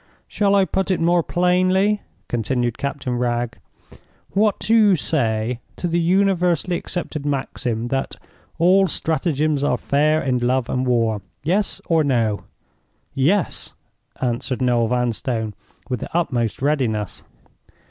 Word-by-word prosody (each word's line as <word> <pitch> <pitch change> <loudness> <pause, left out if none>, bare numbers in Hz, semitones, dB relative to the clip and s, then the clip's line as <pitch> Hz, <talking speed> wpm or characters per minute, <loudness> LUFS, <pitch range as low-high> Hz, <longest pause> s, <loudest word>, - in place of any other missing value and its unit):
"Shall 200 -1 +2
I 195 -1 +4
put 190 +1 -1
it 185 - +1
more 170 +1 +3
plainly?" 185 +4 +2 0.3
continued 120 +1 -1
Captain 135 -3 -3
Wragge. 120 -1 -1 0.7
"What 210 0 +2
do 225 - +2
you 210 -4 +6
say 120 -7 0 0.2
to 175 - -3
the 170 0 +1
universally 180 -1 +2
accepted 170 -4 -4
maxim 125 -4 -2
that 135 +1 -2 0.4
'all 185 +3 +4
stratagems 155 -2 0
are 125 -3 +2
fair 150 +5 +2
in 130 -4 0
love 125 0 0
and 130 0 -1
war'?—Yes 125 - -1
or 165 -2 +3
No?" 115 -7 0 0.7
"Yes!" 160 +8 0 0.4
answered 125 +1 -2
Noel 120 -3 +2
Vanstone, 120 -2 -1 0.3
with 125 -3 -2
the - - -6
utmost 120 -8 -1
readiness. 120 -9 0
140 Hz, 125 wpm, -21 LUFS, 120-175 Hz, 0.7 s, you